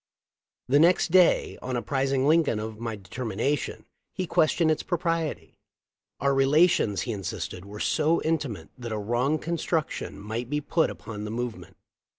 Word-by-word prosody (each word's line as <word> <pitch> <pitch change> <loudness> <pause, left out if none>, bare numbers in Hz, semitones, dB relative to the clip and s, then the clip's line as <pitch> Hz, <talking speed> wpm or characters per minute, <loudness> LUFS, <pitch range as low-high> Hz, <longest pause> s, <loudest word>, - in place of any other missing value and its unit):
The 140 +3 +4
next 170 +1 +4
day, 180 -1 +4
on 130 0 -3
apprising 135 +2 0
Lincoln 160 -7 +3
of 110 0 -6
my 115 -1 -3
determination, 115 +6 -3 0.3
he 185 - -2
questioned 160 0 +3
its 155 - 0
propriety. 165 -3 -2 0.6
Our 140 +1 +2
relations, 135 - +3
he 120 - -3
insisted, 95 -2 -5
were 105 +1 -9
so 160 +6 +2
intimate 140 - -2
that 120 -2 -6
a 110 - -1
wrong 120 +8 0
construction 165 0 -2
might 110 +4 -4
be 150 +1 0
put 160 +2 +1
upon 105 -2 -7
the 105 - -4
movement. 120 +1 -5
135 Hz, 150 wpm, -26 LUFS, 110-160 Hz, 0.6 s, The